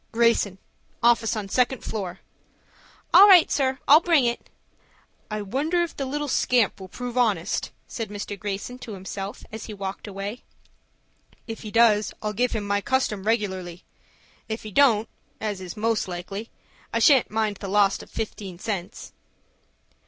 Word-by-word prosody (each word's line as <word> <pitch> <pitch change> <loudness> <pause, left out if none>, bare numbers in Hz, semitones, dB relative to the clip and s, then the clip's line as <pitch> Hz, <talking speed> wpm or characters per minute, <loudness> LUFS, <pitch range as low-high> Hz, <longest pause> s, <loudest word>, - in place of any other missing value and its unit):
"Greyson,—office 230 +1 +1
on 210 -2 -4
second 250 +4 +1
floor." 195 -4 -5 0.9
"All 400 - +10
right, 370 -5 +7
sir; 265 -2 +1
I'll 295 +2 +9
bring 330 -6 +3
it." 235 0 -2 0.8
"I 215 -1 -3
wonder 295 - 0
whether 340 -1 -2
the 275 - -3
little 295 +2 -2
scamp 245 -5 +2
will 190 - -8
prove 245 +5 -4
honest," 225 -5 0 0.2
said 225 -4 -5
Mr. 205 0 -5
Greyson 205 +5 -5
to 225 - -8
himself, 195 +1 -6
as 220 0 -7
he 215 - -7
walked 195 +1 -6
away. 205 +4 -6 1.0
"If 225 -1 -7
he 215 - -7
does, 215 -1 +4
I'll 210 0 -3
give 245 +4 0
him 215 -3 -2
my 200 0 0
custom 210 -5 0
regularly. 190 -6 -2 0.7
If 220 +1 -4
he 215 - -7
don't 225 -2 +4 0.3
as 205 -3 -3
is 185 +3 -8
most 225 -1 0
likely, 190 +5 -6 0.4
I - - 0
shan't 280 -7 +5
mind 215 -1 -1
the 200 - -7
loss 200 0 +3
of - - -13
fifteen 200 -4 -5
cents." 190 -2 -5
215 Hz, 155 wpm, -25 LUFS, 200-245 Hz, 1.0 s, All